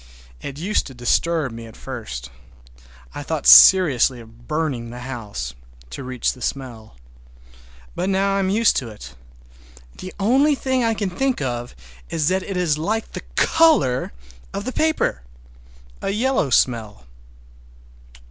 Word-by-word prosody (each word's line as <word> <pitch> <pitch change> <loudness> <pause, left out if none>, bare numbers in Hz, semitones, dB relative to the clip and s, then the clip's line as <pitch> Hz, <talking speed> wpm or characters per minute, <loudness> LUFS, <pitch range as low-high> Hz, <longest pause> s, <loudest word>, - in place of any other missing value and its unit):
It 140 - -7
used 190 +7 -1
to 135 - -11
disturb 145 +4 0
me 115 0 -9
at 110 - -14
first. 85 - -7 0.8
I - - -6
thought - - -4
seriously 130 - +7
of 115 +1 -16
burning 150 -7 -2
the 120 +1 -9
house—to 65 - -8
reach 130 -2 -2
the 125 - -16
smell. 120 - -5 1.0
But 190 - -2
now 195 +1 +1
I - - +1
am 190 -1 0
used 220 +3 +3
to 125 - -3
it. 65 - -11 0.9
The 185 - -7
only 270 +9 +3
thing 260 -2 -1
I 225 -1 +1
can 200 -3 -3
think 265 +7 -1
of 120 - -4 0.3
that 170 +4 0
it 190 0 -5
is 160 -4 +1
like 215 +7 -1
is - - -23
the - - -6
color 315 - +3 0.4
of 200 +1 -4
the 255 - -4
paper! 315 - 0 0.8
A - - -2
yellow 225 - 0
smell. 110 - 0
140 Hz, 145 wpm, -21 LUFS, -, 1.0 s, seriously